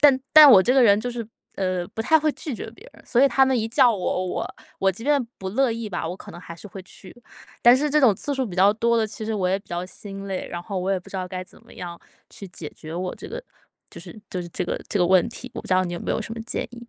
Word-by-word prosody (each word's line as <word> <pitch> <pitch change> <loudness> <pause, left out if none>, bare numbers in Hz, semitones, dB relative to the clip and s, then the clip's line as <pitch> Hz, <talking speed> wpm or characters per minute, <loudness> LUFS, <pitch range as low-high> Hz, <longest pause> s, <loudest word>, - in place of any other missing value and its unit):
但 280 -3 +6
但 305 -2 +10
我 195 -7 +8
这 245 - +2
个 265 -1 +5
人 205 -3 +6
就 245 +3 -3
是 235 -2 -5 0.3
呃， 185 -2 -1
不 - - -7
太 320 +8 +4
会 310 0 +1
拒 295 -4 -6
绝 220 - -7
别 230 - -16
人。 - - -18
所 245 +1 +2
以 275 - +6
他 270 0 +4
们 265 -1 +1
一 220 0 -1
叫 245 0 +4
我， 185 -1 -2
我 180 - -4 0.2
我 195 - +3
即 195 +5 -9
便 290 -1 +3 0.2
不 190 0 -5
乐 260 +5 +2
意 230 0 -4
吧， 175 -3 -3
我 180 - -5
可 - - -12
能 175 - -10
还 170 -1 -10
是 190 - -11
会 195 -1 -9
去。 185 0 -13 0.5
但 240 +1 +7
是 295 +2 0
这 300 +1 +3
种 245 -7 +5
次 285 - -4
数 265 -1 -1
比 185 -4 -8
较 195 +2 +5
多 235 +2 +1
了， 225 -1 +2
其 215 - -9
实 220 - -1
我 190 -3 0
也 190 +1 +1
比 200 - -23
较 175 +1 -3
心 195 +1 -9
累， 190 -2 -4
然 175 0 -6
后 195 +1 -4
我 185 +1 -2
也 195 - +1
不 180 - -15
知 - - -5
道 185 -1 -4
该 185 0 -5
怎 - - -16
么 - - -17
样 170 -1 -8 0.3
去 200 - -9
解 165 -4 -8
决 155 +1 -9
我 180 +1 -3
这 - - -10
个 - - -6 0.5
就 - - -10
是 - - -11
就 185 - -3
是 175 - -7
这 - - -3
个 - - -3
这 205 - -1
个 175 - +3
问 185 +4 +4
题， 250 +2 -7
我 - - -4
不 - - -12
知 185 - +3
道 185 0 +3
你 175 - -4
有 175 - -5
没 - - -4
有 - - -2
什 220 - -7
么 230 - -6
建 230 - -3
议？ 240 -1 -12
205 Hz, 340 characters per minute, -23 LUFS, 185-245 Hz, 0.5 s, 但